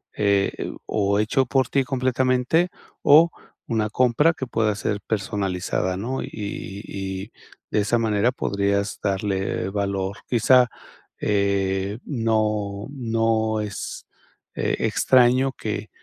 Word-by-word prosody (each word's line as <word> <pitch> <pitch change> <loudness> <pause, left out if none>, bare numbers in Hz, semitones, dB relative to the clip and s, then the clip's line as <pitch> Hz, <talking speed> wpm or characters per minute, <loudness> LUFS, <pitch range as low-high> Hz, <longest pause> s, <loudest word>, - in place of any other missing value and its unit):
eh, 100 -1 +1
o 100 -1 +1
hecho 130 +5 +2
por 130 0 +1
ti 135 - +2
completamente, 130 +5 +1 0.3
o 160 +4 +6 0.4
una 110 -2 0
compra 130 +8 +3
que 135 - -5
pueda 110 -3 0
ser 105 0 -2
personalizada, 95 -3 -1
¿no? 125 +7 -3
Y - - -6 0.6
y 95 +2 -5 0.4
de 105 - +2
esa 105 +4 +2
manera 110 +1 +2
podrías 100 -3 -1
darle 95 -1 -1
valor. 100 -1 -2
Quizá 125 +1 +5 0.5
eh, 100 0 0
no 105 -5 -1
no 115 -4 0
es, 105 -2 -6 0.5
eh, - - 0
extraño 130 +1 +3
que - - -4
105 Hz, 110 wpm, -23 LUFS, 100-125 Hz, 0.6 s, o